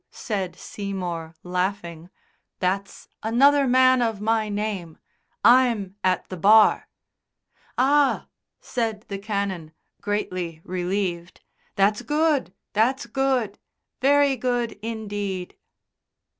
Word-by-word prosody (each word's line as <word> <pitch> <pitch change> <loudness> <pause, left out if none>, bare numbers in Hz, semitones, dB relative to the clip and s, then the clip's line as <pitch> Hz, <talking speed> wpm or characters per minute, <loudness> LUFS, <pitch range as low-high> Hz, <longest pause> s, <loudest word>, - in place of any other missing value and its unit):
said 195 -5 -4
Seymour, 175 -5 -5
laughing, 180 -2 -3 0.5
"that's 195 +2 -2
another 275 +5 +4
man 255 0 +5
of 225 -3 0
my 220 0 0
name. 205 -6 -3 0.5
I'm 235 -6 +4
at 185 -1 +1
the 185 - -6
Bar." 210 +5 +5 0.9
"Ah," 280 +2 +3 0.3
said 225 -3 -3
the 200 -1 -4
Canon, 200 -6 -3 0.3
greatly 185 -5 -3
relieved, 180 -1 -3 0.3
"that's 200 +2 +2
good! 300 - +1 0.2
That's 245 +6 +1
good! 260 -6 -1 0.4
Very 280 0 +4
good 245 -1 -1
indeed!" 205 -4 -4
205 Hz, 95 wpm, -24 LUFS, 185-245 Hz, 0.9 s, man